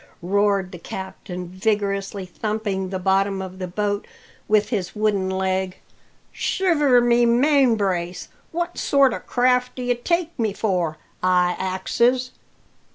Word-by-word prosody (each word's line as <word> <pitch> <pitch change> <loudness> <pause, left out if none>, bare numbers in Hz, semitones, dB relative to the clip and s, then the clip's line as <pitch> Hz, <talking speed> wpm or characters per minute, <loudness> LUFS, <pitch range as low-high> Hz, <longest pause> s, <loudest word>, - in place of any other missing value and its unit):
roared 200 0 +1
the 175 - -9
captain, 180 -1 -7
vigorously 200 0 -1
thumping 200 0 -3
the 190 - -3
bottom 195 +1 +1
of 185 0 -7
the 185 - -3
boat 205 +2 -2 0.4
with 210 -1 +3
his 195 -6 -2
wooden 210 -3 +1
leg. 190 0 -1 0.5
"Shiver 295 -9 +2
my 240 0 +4
main 255 +1 +4
brace! 180 -3 -2 0.2
what 345 +1 -3
sort 275 -2 +4
o' - - -3
craft 250 0 +1
do 255 - -5
ye 245 0 +2
take 340 +7 -1
me 220 -3 0
for, 180 -7 -1 0.2
I 180 -1 +3
axes? 235 +7 +1
200 Hz, 135 wpm, -22 LUFS, 185-240 Hz, 0.5 s, my